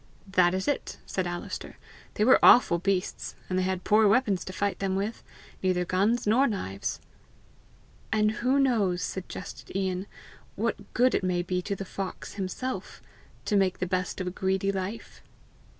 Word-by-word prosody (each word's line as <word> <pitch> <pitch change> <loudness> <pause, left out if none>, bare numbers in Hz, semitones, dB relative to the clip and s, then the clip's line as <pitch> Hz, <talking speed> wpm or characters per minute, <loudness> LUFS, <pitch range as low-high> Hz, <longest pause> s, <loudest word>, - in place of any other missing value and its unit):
"That 180 -1 +4
is 190 - -2
it," 285 - -1
said 185 -2 -2
Alister. 175 0 -6 0.4
"They 210 - +2
were 260 - +6
awful 170 -8 +7
beasts! 185 0 -2 0.2
and 185 - +2
they - - +2
had 185 0 -1
poor 215 +1 +5
weapons 205 -3 +2
to - - -5
fight 200 +2 -1
them 195 -1 0
with 205 +4 -2 0.4
neither 180 -1 +1
guns 200 +7 +1
nor 240 +7 +4
knives!" 100 - -3 1.1
"And 215 0 +3
who 255 +3 +3
knows," 210 -10 +2
suggested 190 0 -7
Ian, 190 0 -1 0.5
"what - - -3
good 250 0 +4
it - - +1
may 180 -1 0
be 180 +1 -1
to 200 +2 -3
the 195 - -6
fox 190 0 -6
himself 210 +7 -4 0.5
to 210 - +1
make 190 -2 +2
the 185 - -1
best 185 +1 -2
of 185 - -2
a 180 - -2
greedy 190 +1 0
life?" 195 +3 -5
190 Hz, 165 wpm, -28 LUFS, 185-215 Hz, 1.1 s, awful